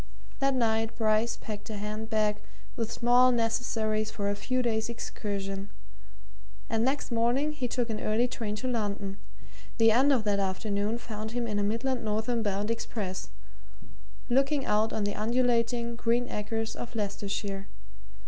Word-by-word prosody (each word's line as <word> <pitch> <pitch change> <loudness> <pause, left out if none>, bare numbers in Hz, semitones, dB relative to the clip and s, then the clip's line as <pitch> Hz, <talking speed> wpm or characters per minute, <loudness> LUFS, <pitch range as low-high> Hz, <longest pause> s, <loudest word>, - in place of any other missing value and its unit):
That 275 -1 +2
night 225 -2 +1
Bryce 220 +1 +2
packed 210 -1 -6
a 215 - -4
hand 215 +2 -4
bag 215 -2 +2 0.4
with 230 -3 -2
small 245 +1 +5
necessaries 225 -2 0
for 200 -2 -1
a - - -1
few 255 +5 0
days' 220 -1 0
excursion, 200 -4 -4 1.0
and 225 0 +1
next 270 +1 0
morning 240 +6 +2
he 265 -5 -2
took 245 0 0
an 215 - -2
early 220 +3 +2
train 225 -4 -3
to 215 +5 -3
London; 205 -4 -2 0.6
the 225 -1 +6
end 265 +6 +5
of 255 -5 +3
that 205 -1 +2
afternoon 200 +3 0
found 220 -1 -6
him 240 -1 0
in 210 -2 -1
a - - +1
Midland 230 +5 0
northern 220 +2 0
bound 205 +1 0
express, 205 - -3 1.0
looking 275 +2 +2
out 215 +1 +2
on 215 - -1
the 205 0 0
undulating, 235 +1 +1
green 240 +1 +1
acres 225 +2 -2
of 240 - -7
Leicestershire. 200 -1 -2
225 Hz, 155 wpm, -29 LUFS, 210-240 Hz, 1.0 s, the